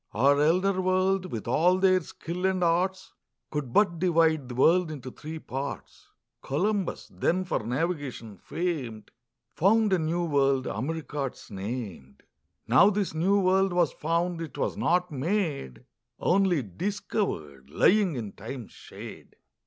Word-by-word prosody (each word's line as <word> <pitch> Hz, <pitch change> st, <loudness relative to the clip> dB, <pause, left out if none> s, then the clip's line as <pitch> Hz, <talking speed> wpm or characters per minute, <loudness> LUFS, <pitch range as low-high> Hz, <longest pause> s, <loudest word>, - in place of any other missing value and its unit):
Our 140 Hz, +5 st, +4 dB
Elder 185 Hz, +5 st, +2 dB
World, 185 Hz, 0 st, +1 dB
with 110 Hz, -1 st, -5 dB
all 175 Hz, +9 st, +3 dB
their 185 Hz, -1 st, +4 dB
Skill 175 Hz, +3 st, -4 dB
and 185 Hz, -1 st, 0 dB
Arts, 185 Hz, +3 st, 0 dB, 0.4 s
Could 150 Hz, -5 st, -3 dB
but 170 Hz, -, +3 dB
divide 160 Hz, -6 st, +2 dB
the 125 Hz, -, -6 dB
World 170 Hz, +6 st, +4 dB
into 130 Hz, -4 st, -7 dB
three 155 Hz, +5 st, -8 dB
Parts: 140 Hz, -2 st, -6 dB, 0.3 s
Columbus, 195 Hz, +6 st, -1 dB
then 185 Hz, +2 st, 0 dB
for 175 Hz, -, -1 dB
Navigation 130 Hz, -, -3 dB
fam'd, 135 Hz, -, -4 dB, 0.4 s
Found 210 Hz, +3 st, +3 dB
a 185 Hz, -, +3 dB
new 165 Hz, +2 st, 0 dB
World, 140 Hz, -4 st, +2 dB
America 145 Hz, +3 st, -3 dB
'tis -, -, -16 dB
nam'd; 100 Hz, -, -6 dB, 0.4 s
Now 150 Hz, -, +6 dB
this 205 Hz, -4 st, -1 dB
new 190 Hz, +6 st, +2 dB
World 190 Hz, 0 st, +3 dB
was 175 Hz, -3 st, +2 dB
found, 170 Hz, +2 st, -1 dB
it 160 Hz, -5 st, -7 dB
was -, -, -1 dB
not 180 Hz, 0 st, +1 dB
made, 145 Hz, -, -2 dB, 0.3 s
Onely 180 Hz, -5 st, +2 dB
discovered, 90 Hz, -, -3 dB
lying 190 Hz, -, +3 dB
in 110 Hz, -5 st, -5 dB
Time's 115 Hz, +4 st, -8 dB
shade. -, -, -11 dB
165 Hz, 135 wpm, -27 LUFS, 130-185 Hz, 0.4 s, Now